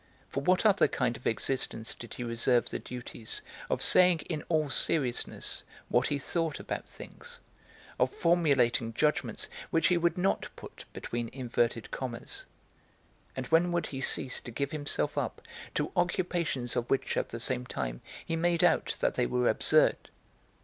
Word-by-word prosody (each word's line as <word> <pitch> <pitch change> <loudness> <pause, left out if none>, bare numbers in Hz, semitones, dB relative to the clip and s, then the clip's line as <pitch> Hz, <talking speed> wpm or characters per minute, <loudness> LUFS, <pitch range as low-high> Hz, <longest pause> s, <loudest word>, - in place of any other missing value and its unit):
For 140 - -3
what 185 +7 +3
other 205 -1 +5
kind 125 -2 0
of - - -5
existence 115 -1 -1
did 120 - -9
he 125 - -4
reserve 120 +1 +2
the - - -3
duties 120 -2 -6 0.3
of - - +1
saying 180 -3 +6
in 155 0 -4
all 155 -3 +2
seriousness 135 -2 0 0.3
what 120 +1 +3
he 145 - 0
thought 165 +2 -1
about - - -5
things, 485 0 -10 0.6
of - - +3
formulating 140 - +2
judgments 150 +3 0 0.2
which 165 -1 +3
he 180 - +4
would 170 +1 +1
not 185 +2 +1
put - - -11
between 120 -1 -4
inverted 120 -3 -1
commas; 120 -3 -5 0.9
and 130 - -3
when 165 +2 +4
would 175 0 0
he 135 -1 -5
cease 130 -1 +1
to - - -8
give 140 +4 -2
himself 145 -2 -1
up - - -3 0.4
to - - 0
occupations 175 -8 0
of 120 0 -1
which 135 - +1
at - - -1
the 115 - -6
same, 125 +1 -1
time - - -4 0.2
he 165 - -1
made 170 +1 +2
out 175 -2 +3
that - - +2
they 125 - +1
were 125 -1 +1
absurd? - - +3
135 Hz, 165 wpm, -30 LUFS, 120-170 Hz, 0.9 s, saying